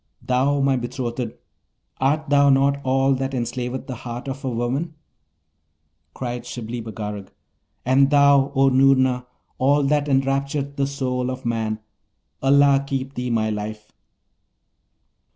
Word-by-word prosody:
Thou, 135 +3 +1
my 135 -1 +2
betrothed, 120 -1 -4 0.7
art 150 +4 +1
thou 140 0 +4
not 140 +1 +2
all 135 +1 +2
that 135 0 -2
enslaveth 125 +1 -3
the 130 -2 -6
heart 120 +2 -7
of 135 +1 -5
woman?' 130 +6 -2 1.2
Cried 120 -1 -4
Shibli 120 -1 -6
Bagarag, 105 -2 -6 0.6
'And 135 +2 +4
thou, 140 -1 +4
O 135 0 +5
Noorna, 130 -1 +3 0.3
all 140 +2 +3
that 145 +1 +1
enraptureth 140 +1 0
the 140 -1 0
soul 130 -2 -2
of 130 0 -6
man! 110 -2 -2 0.6
Allah 140 0 +4
keep 135 0 -3
thee, 125 -1 -3
my 110 -2 0
life!' 105 0 -6
130 Hz, 125 wpm, -22 LUFS, 120-140 Hz, 1.2 s, O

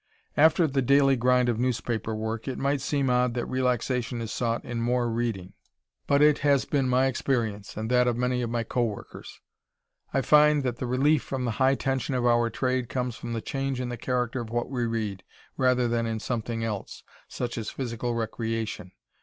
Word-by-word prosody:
After 160 +3 +5
the 135 -2 0
daily 135 +1 +4
grind 125 0 +3
of 115 -2 0
newspaper 115 -3 -1
work, 110 +2 -4
it 130 - -3
might 140 0 0
seem 140 0 0
odd 125 -1 +2
that 120 - -1
relaxation 125 -1 -1
is 115 -2 -4
sought 115 -1 -1
in 120 -1 -3
"more 120 +1 +1
reading" 115 -6 -3 0.5
but 140 +1 +4
it 150 -1 +5
has 140 -2 +3
been 135 -3 0
my 130 +1 +3
experience, 115 -7 -1
and 110 +1 -3
that 125 0 +4
of 120 -1 +1
many 125 0 0
of 120 - -2
my 120 0 -1
co 120 +2 -1
workers. 105 -4 -6 0.7
I 135 - +1
find, 150 +1 +5
that 125 -2 -2
the 125 - -3
relief 135 +4 +3
from 130 -2 -4
the 120 - 0
high 135 +1 +5
tension 135 -1 -1
of 125 -1 0
our 120 -1 +3
trade 130 -1 -1
comes 125 -2 -2
from 120 -1 -6
the 115 - -2
change 135 0 -3
in 125 -1 -3
the 120 - -3
character 125 0 -1
of 115 - -7
what 120 +3 -2
we 125 -3 -1
read, 110 -4 -3 0.3
rather 125 -2 +2
than 115 0 0
in 110 -1 -2
"something 115 0 -3
else," 105 -3 -5 0.2
such 120 -1 -4
as 115 -2 -4
physical 120 -2 -3
recreation. 115 -4 -3
125 Hz, 200 wpm, -27 LUFS, 115-130 Hz, 0.7 s, After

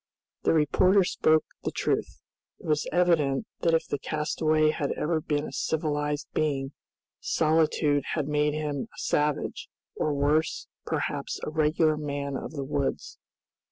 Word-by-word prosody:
The - - +2
reporter 180 +6 +4
spoke 155 -3 +2 0.2
the - - 0
truth. - - -2 0.3
It - - -15
was 150 -1 0
evident 170 -3 +2
that 165 -1 +3
if 160 - +1
the 145 - -2
castaway 155 +1 +1
had 145 -2 -2
ever 160 +1 -1
been 150 0 -1
a - - -7
civilized 150 -2 -1
being, 140 -3 0 0.5
solitude 155 -2 +2
had 150 -4 -1
made 150 0 +1
him 150 -3 -3
a - - -19
savage, 150 -1 -1 0.3
or 155 - 0
worse, 150 +3 +1 0.2
perhaps - - -2
a - - -3
regular 155 0 +2
man 140 -2 -3
of 135 - -5
the 140 -3 -3
woods. 140 -1 -2
150 Hz, 145 wpm, -27 LUFS, 145-155 Hz, 0.5 s, reporter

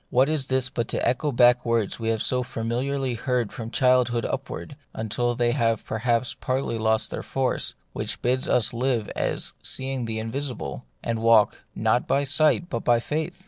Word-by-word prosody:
What 130 +3 +3
is 150 -4 0
this 130 -1 +1
but 120 -3 -3
to - - -1
echo 135 +5 +1
back 120 -1 +5
the 120 - -5
words 115 -3 0
we 115 0 -1
have 115 -1 0
so 125 -1 +1
familiarly 125 +3 -2
heard 120 -2 -1
from 115 -4 -6
childhood 125 -1 +2
up 135 0 -3
ward, 145 - -7 0.3
till 120 +3 0
they 120 0 +2
have 115 -4 +1
perhaps 120 +2 0
partly 130 -3 -2
lost 110 0 +1
their - - -4
force, 135 -1 -1 0.2
which - - -3
bid 130 +1 +1
us 120 -2 +2
live 120 -2 0
as - - -1
seeing 130 -2 -2
the 110 -1 -3
invisible, 115 - -4 0.2
and 115 -1 -1
walk, 115 -2 +4
not - - +1
by 140 - +2
sight 155 +5 +3
but 120 -9 -2
by 120 -1 +4
faith 155 +7 -3
120 Hz, 185 wpm, -25 LUFS, 115-130 Hz, 0.3 s, back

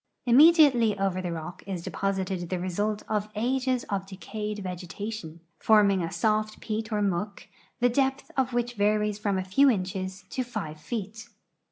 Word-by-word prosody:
Immediately 260 - +6
over 195 -1 0
the 180 -2 -3
rock 170 +2 -6
is 185 -4 -4
deposited 190 -3 -2
the 185 - -1
result 205 +4 -2
of 210 -1 -1
ages 255 +2 0
of 195 -1 -3
de 195 - -9
cayed 210 +1 -5
vegetation, 180 -1 -6 0.2
forming 205 -3 +4
a 165 - -3
soft 215 -1 0
peat 220 0 -4
or 210 -1 +1
muck, 200 +1 -2 0.4
the 245 - +5
depth 265 +2 0
of 260 -2 +1
Avhich 240 -1 -1
varies 210 -1 +1
from 200 -2 0
a 185 - -1
few 235 +10 +4
inches 190 -3 -2
to 255 - -1
five 160 -11 -6
feet. 215 +4 -6
210 Hz, 165 wpm, -27 LUFS, 185-230 Hz, 0.4 s, Immediately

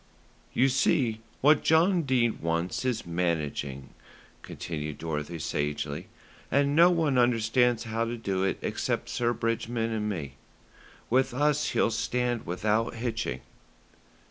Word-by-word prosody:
"You 130 - +3
see, 130 -4 +1 0.2
what 150 +2 +5
John 170 +3 +4
Dene 125 -6 +1
wants 85 +5 -1
is 125 -3 -1
managing," 75 -6 -2 0.5
continued 75 -3 -5
Dorothy 80 +1 -4
sagely, 75 +2 -3 0.4
"and 140 +1 +2
no 170 +2 +7
one 160 -7 +2
understands 120 0 +2
how 115 0 -1
to 120 +1 -4
do 95 -4 -1
it 95 - 0
except - - -2
Sir 120 -1 0
Bridgman 115 0 -1
and 105 -1 -1
me. 70 -9 -5 0.7
With 130 0 +2
us 150 +1 +2
he'll - - +2
stand 120 +1 -1
without 105 +7 0
hitching." 115 - -3
115 Hz, 125 wpm, -28 LUFS, 85-125 Hz, 0.7 s, no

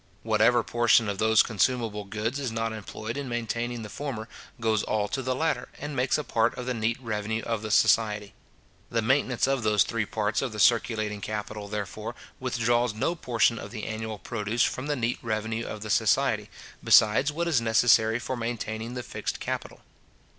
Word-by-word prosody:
Whatever 115 +2 +3
portion 120 -1 +3
of 100 -1 -3
those 110 0 +5
consumable 115 -2 0
goods 110 +6 -3
is 130 -4 -2
not 115 0 -2
employed 110 +2 -6
in 140 -2 -4
maintaining 120 0 -3
the - - -6
former, 120 -4 -5 0.3
goes 110 -2 +1
all 105 -1 0
to 135 - -2
the 130 0 -1
latter, 155 -4 -1
and 145 0 -6
makes 125 0 +2
a 150 - -2
part 115 -2 +1
of 125 - -5
the 125 - -1
neat 115 0 0
revenue 110 -2 -3
of 115 -2 -2
the 110 - -5
society. 105 -2 +3 0.6
The 115 -1 0
maintenance 130 0 +2
of 135 -1 0
those 105 -2 +4
three 115 -3 -2
parts 105 0 -1
of 130 -4 -3
the 105 - -6
circulating 110 -2 +2
capital, 105 0 -5
therefore, 105 -2 -5 0.2
withdraws 120 -1 +1
no 140 +10 0
portion 120 -7 +1
of - - -7
the 110 -1 -6
annual 110 -1 -4
produce 110 +2 -1
from 130 +3 -1
the 150 - 0
neat 120 -2 -1
revenue 110 0 -2
of 110 - -6
the 110 - -4
society, - - +2 0.3
besides 110 +7 +5
what 170 +3 -2
is 150 -8 +2
necessary 115 0 +4
for 130 +2 -4
maintaining 115 0 -4
the 125 - -4
fixed - - -4
capital. - - -5
115 Hz, 185 wpm, -27 LUFS, 110-120 Hz, 0.6 s, those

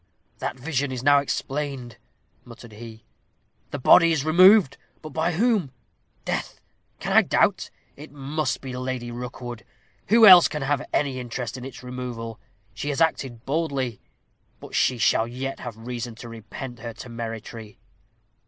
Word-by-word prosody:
"That - - -4
vision 140 -1 -1
is 130 -1 -5
now 145 0 +6
explained," 135 -3 -4 0.5
muttered 120 -1 -13
he; 110 0 -11 0.6
"the - - -4
body 165 +5 +6
is 155 -3 0
removed, 180 -1 +6 0.3
but 155 - -7
by 160 +4 0
whom? 205 - +1 0.5
Death! - - -3 0.4
can - - -2
I - - +8
doubt? - - +1 0.3
It 150 +2 -12
must 145 +2 -3
be 130 -2 -6
Lady 125 -1 -4
Rookwood 120 -1 -7 0.4
who 225 +1 +6
else 180 -4 +10
can 150 -2 -4
have 140 -2 0
any 135 -3 0
interest 125 -1 -5
in 130 - -8
its 130 -1 -9
removal. 125 -3 -6 0.3
She 145 - -4
has 140 - -2
acted 135 -7 0
boldly. 140 -6 -2 0.6
But - - -12
she 125 - +2
shall 115 0 +2
yet 130 +3 -5
have 120 -3 -7
reason 120 0 -6
to 120 +1 -10
repent 115 +2 -8
her 115 0 -7
temerity." 115 -2 -7
130 Hz, 150 wpm, -24 LUFS, 120-145 Hz, 0.6 s, else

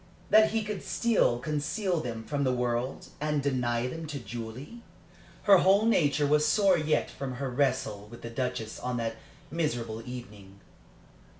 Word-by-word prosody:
that 215 0 +7
he 220 0 0
could 210 -1 -4
still 230 - +2
conceal 155 - -1
them 115 -5 -5
from 145 +3 -2
the 130 - +2
world, 125 +1 -2
and 150 -2 0
deny 125 -3 0
them 160 +5 -5
to 150 -1 -4
Julie? 120 - -7 0.6
Her 200 -3 +7
whole 195 +4 +4
nature 150 -9 +3
was 150 +1 +3
sore 195 +4 +4
yet 155 -2 0
from 135 -2 -5
her 135 +1 -3
wrestle 115 -6 0
with 120 +1 -12
the 115 - -6
Duchess 115 -3 -3
on 125 -1 -2
that 115 -1 -2 0.3
miserable 120 -9 -2
evening. 105 -6 -10
135 Hz, 160 wpm, -29 LUFS, 120-155 Hz, 0.6 s, that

